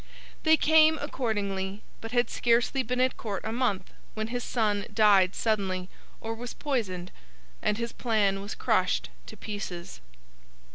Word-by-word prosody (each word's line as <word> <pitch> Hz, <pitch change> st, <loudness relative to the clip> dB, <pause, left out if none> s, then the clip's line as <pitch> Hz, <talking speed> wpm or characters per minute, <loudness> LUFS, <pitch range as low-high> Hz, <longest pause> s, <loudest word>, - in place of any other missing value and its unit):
They 315 Hz, -1 st, +5 dB
came, 315 Hz, 0 st, +5 dB
accordingly, 205 Hz, -8 st, -2 dB, 0.2 s
but 225 Hz, -, -7 dB
had 245 Hz, 0 st, +1 dB
scarcely 240 Hz, +3 st, +2 dB
been 250 Hz, +1 st, -2 dB
at 255 Hz, 0 st, +2 dB
Court 205 Hz, -4 st, -4 dB
a 220 Hz, -, -2 dB
month 225 Hz, -6 st, -1 dB, 0.2 s
when 220 Hz, 0 st, -3 dB
his 245 Hz, 0 st, -3 dB
son 210 Hz, -4 st, 0 dB
died 200 Hz, -4 st, +5 dB
suddenly—or 200 Hz, +1 st, -3 dB
was 235 Hz, +1 st, -7 dB
poisoned—and 180 Hz, -, -4 dB
his 235 Hz, 0 st, -3 dB
plan 205 Hz, -5 st, +1 dB
was 200 Hz, +1 st, -6 dB
crushed -, -, +1 dB, 0.2 s
to -, -, -10 dB
pieces. 185 Hz, -, -6 dB
215 Hz, 135 wpm, -28 LUFS, 195-245 Hz, 0.2 s, They